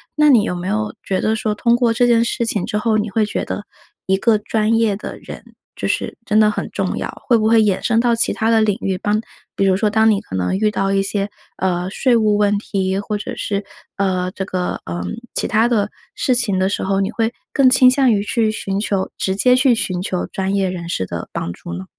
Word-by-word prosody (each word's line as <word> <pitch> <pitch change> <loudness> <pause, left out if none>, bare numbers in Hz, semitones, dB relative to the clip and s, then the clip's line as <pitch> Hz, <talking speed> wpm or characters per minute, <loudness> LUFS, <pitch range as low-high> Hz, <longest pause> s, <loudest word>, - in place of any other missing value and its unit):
那 300 0 +4
你 240 -7 +6
有 195 - -2
没 175 +1 -5
有 215 +1 -1
觉 190 - -2
得 220 +1 +1
说 215 -1 -2
通 235 +2 +2
过 240 -1 +2
这 240 +2 +2
件 235 -1 +4
事 235 0 -1
情 205 -4 -1
之 210 - -1
后， 215 0 +1
你 210 0 -2
会 215 +2 +1
觉 210 - -3
得 205 - -4 0.4
一 190 - +2
个 215 +2 +3
专 220 +1 0
业 225 -3 +2
的 210 - -7
人， - - -10 0.3
就 - - -3
是 - - -2
真 215 -1 +2
的 215 -1 +5
很 - - -4
重 - - -2
要， - - -3 0.2
会 240 - +4
不 215 0 +1
会 225 0 +5
衍 200 -3 +1
生 230 -1 +2
到 240 0 +2
其 230 - +2
它 225 +1 -1
的 225 -1 +4
领 210 -2 +1
域。 190 -1 -1
当 210 +1 0 0.4
比 195 - +1
如 190 -1 +3
说 210 +2 +1
当 220 +1 +3
你 200 - 0
可 - - -14
能 90 - 0
遇 215 +1 +2
到 195 -1 -1
一 195 - +2
些， 200 +1 -2 0.3
呃， 180 -1 -1
税 250 +5 +2
务 215 -2 +3
问 205 0 +2
题， 190 -2 -2
或 210 +1 -3
者 205 - -6
是， 200 0 -2 0.3
呃， 185 -2 0
这 190 -1 -5
个， 180 -1 -3
嗯， 85 +1 -4 0.3
其 - - 0
它 220 +2 +3
的 210 -4 +1 0.3
事 255 - +1
情 210 -6 +2
的 190 +1 +2
时 - - -2
候， 195 +1 0
你 195 +3 -1
会 225 0 -1 0.2
更 270 -3 +4
倾 255 0 +6
向 260 -2 +3
于 200 -1 +1
去 220 0 0
寻 195 -2 -3
求 200 -2 -1
直 190 0 -1
接 250 +5 +4
去 255 -1 +4
寻 185 -5 -1
求 185 -1 -2
专 190 0 -3
业 195 -2 +1
人 170 -2 -6
士 95 - -1
的 85 -2 -6
帮 85 - -4
助 85 - -9
呢？ 95 - -7
210 Hz, 265 characters per minute, -19 LUFS, 190-225 Hz, 0.4 s, 你